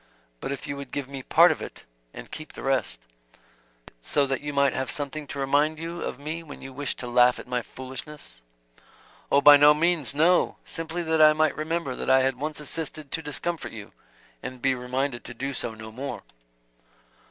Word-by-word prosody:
But - - -4
if 140 - -5
you 140 - -4
would 140 - -8
give 140 -3 -3
me 135 -1 -6
part - - +6
of - - -3
it - - -8 0.3
and - - -10
keep 155 -1 -8
the - - -9
rest 125 - 0 0.5
" - - -36 0.2
"So 145 - +1
that 135 -2 -2
you 145 0 -4
might 140 -1 +3
have 130 -1 -2
something 145 +1 -4
to 140 - -7
remind 145 +3 +2
you 165 +2 -5
of - - -4
me 155 +4 -5
when 155 -3 -10
you 135 0 -9
wished 140 0 -3
to 125 - -5
laugh 125 +1 +5
at - - -8
my 125 -1 -1
foolishness?" 130 - -10 0.9
"Oh, 140 - +5
by 145 0 +10
no 145 +1 +7
means, 160 -3 +1
no! 170 +4 +3
Simply 165 +1 -4
that 160 -1 +2
I 155 0 +8
might 155 0 +2
remember 155 -3 -2
that - - -4
I 130 0 +6
had 130 0 +1
once 150 +1 -3
assisted 150 -1 -4
to 160 - -2
discomfort 160 +3 -4
you, 105 -2 -9 0.5
and 130 0 -7
be 135 +1 +2
reminded 125 0 -2
to 120 - -6
do 135 +3 -3
so 115 -3 -4
no 110 0 -9
more." 130 +5 -6
140 Hz, 205 wpm, -26 LUFS, 130-155 Hz, 0.9 s, by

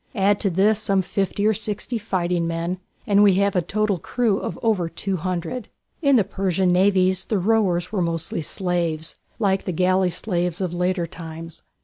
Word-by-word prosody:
Add 200 0 +3
to 200 - +1
this 200 +4 +3
some 195 -3 +1
fifty 200 +2 -1
or 220 - +4
sixty 215 +3 -3
fighting 180 -5 -1
men 170 +2 -2 0.3
and 200 0 +4
we 200 -3 +6
have 200 0 +2
a 180 - +3
total 210 +1 0
crew 225 +1 0
of - - -5
over 200 -7 +1
two 195 +2 -2
hundred. 185 +6 -3 0.3
In 280 -3 +4
the 225 - +5
Persian 190 -1 0
navies 185 0 +3
the 215 - 0
rowers 185 -3 +1
were 205 -4 0
mostly 165 -1 -2
slaves, 170 -1 -2 0.2
like 195 -4 +1
the - - -1
galley 185 +2 +2
slaves 175 -1 -2
of 185 -3 -2
later 180 0 0
times. 165 -1 -9
185 Hz, 180 wpm, -23 LUFS, 175-205 Hz, 0.3 s, we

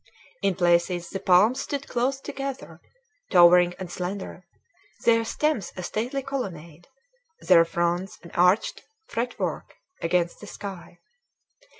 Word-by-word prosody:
In 195 -2 +1
places 175 0 +1
the 195 - -3
palms 210 +10 +4
stood 280 -1 -4
close 260 +3 -1
together, 275 -1 -6 0.5
towering 175 -1 +6
and 185 -2 -7
slender, 185 0 -6 0.6
their 230 -1 +4
stems 235 - -1
a 185 - -5
stately 245 +9 -3
colonnade, 175 - -6 0.5
their 170 -2 +6
fronds 175 +3 -1
an 170 - -12
arched 180 +5 +2 0.2
fretwork 245 +2 -4 0.3
against 170 0 0
the 210 - -11
sky. 190 -4 -9
185 Hz, 115 wpm, -25 LUFS, 175-235 Hz, 0.6 s, towering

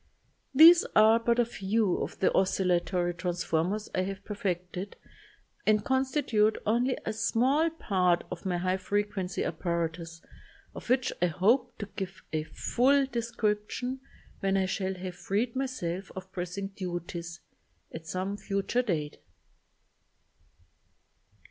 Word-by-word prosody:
These 330 +5 +9
are 220 +1 +6
but 235 0 +1
a 240 - +4
few 210 -2 0
of - - -4
the 190 - +2
oscillatory 180 -1 +1
transformers 180 +3 -1
I 185 - +1
have 195 +1 -5
perfected 185 -1 -4 0.7
and 215 -1 +3
consti 265 +2 +1
tute 215 -1 +3
only 240 +4 +1
a 220 - -1
small 255 +9 +2
part 185 - +1
of 180 - -6
my 180 -3 -1
high 185 +1 0
frequency 200 -2 -2
apparatus 165 0 -3 0.5
of - - -10
which 255 0 +2
I 180 - +4
hope 235 +9 +2
to 205 - -4
give 190 -1 -6
a 155 - +1
full 270 - +2
description, 235 0 -2 0.4
when 195 0 +1
I 190 - +2
shall 190 +1 -2
have 180 -1 -7
freed 230 +5 -1
myself 195 -9 -3
of 190 0 -8
pressing 185 +2 -4
duties, 175 -3 -6 0.5
at 160 0 -8
some 190 +3 -3
future 200 +5 0
date. 160 -11 -3
195 Hz, 130 wpm, -29 LUFS, 180-230 Hz, 0.7 s, These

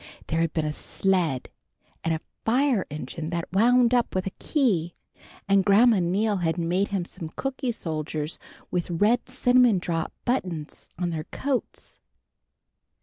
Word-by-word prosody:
There 165 - -1
had 165 -1 +1
been 160 -2 -1
a 150 - -1
sled, 175 -7 0 0.5
and 165 - 0
a 160 - 0 0.2
fire 250 -2 +2
engine 150 +2 -5
that 170 0 -4
wound 240 +4 +4
up 240 -5 +2
with 185 - 0
a 195 - -4
key, 195 - +1 0.5
and 195 -1 +4
Grandma 210 +2 +5
Neal 200 +4 +1
had 165 -1 0
made 175 +4 +1
him 195 -3 -2
some 165 -2 -7
cooky 265 - -3
soldiers 155 -5 -3 0.3
with 175 -1 -1
red 210 +8 +2
cinnamon 245 -4 +4
drop 165 -2 -2
buttons 180 - -3
on 175 -1 -1
their 155 -2 -4
coats. 270 -3 -3
185 Hz, 145 wpm, -26 LUFS, 165-235 Hz, 0.5 s, Grandma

